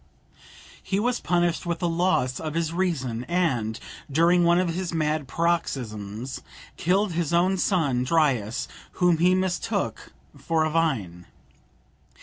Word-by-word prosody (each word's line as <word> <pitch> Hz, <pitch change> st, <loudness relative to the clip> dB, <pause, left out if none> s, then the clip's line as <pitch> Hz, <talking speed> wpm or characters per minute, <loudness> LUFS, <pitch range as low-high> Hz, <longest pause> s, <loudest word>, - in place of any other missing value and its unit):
He 195 Hz, -, -1 dB
was 245 Hz, +3 st, 0 dB
punished 175 Hz, 0 st, 0 dB
with 170 Hz, 0 st, -1 dB
the 175 Hz, -, -1 dB
loss 165 Hz, -7 st, +1 dB
of 155 Hz, -1 st, -5 dB
his 165 Hz, -1 st, -1 dB
reason, 135 Hz, -11 st, -1 dB
and, 130 Hz, -12 st, 0 dB, 0.3 s
during 170 Hz, +4 st, +4 dB
one 170 Hz, +1 st, +4 dB
of 180 Hz, -1 st, +1 dB
his 175 Hz, -1 st, -3 dB
mad 155 Hz, -2 st, 0 dB
paroxysms, 125 Hz, -8 st, -2 dB, 0.3 s
killed 195 Hz, +3 st, +1 dB
his 170 Hz, -1 st, -1 dB
own 180 Hz, +3 st, +3 dB
son 155 Hz, -10 st, +1 dB
Dryas, 130 Hz, -7 st, +1 dB, 0.3 s
whom 175 Hz, -3 st, +2 dB
he 180 Hz, +2 st, +4 dB
mistook 185 Hz, -1 st, -2 dB, 0.2 s
for 160 Hz, -1 st, 0 dB
a 155 Hz, -, -1 dB
vine. 105 Hz, -, -1 dB
165 Hz, 135 wpm, -25 LUFS, 130-175 Hz, 0.3 s, during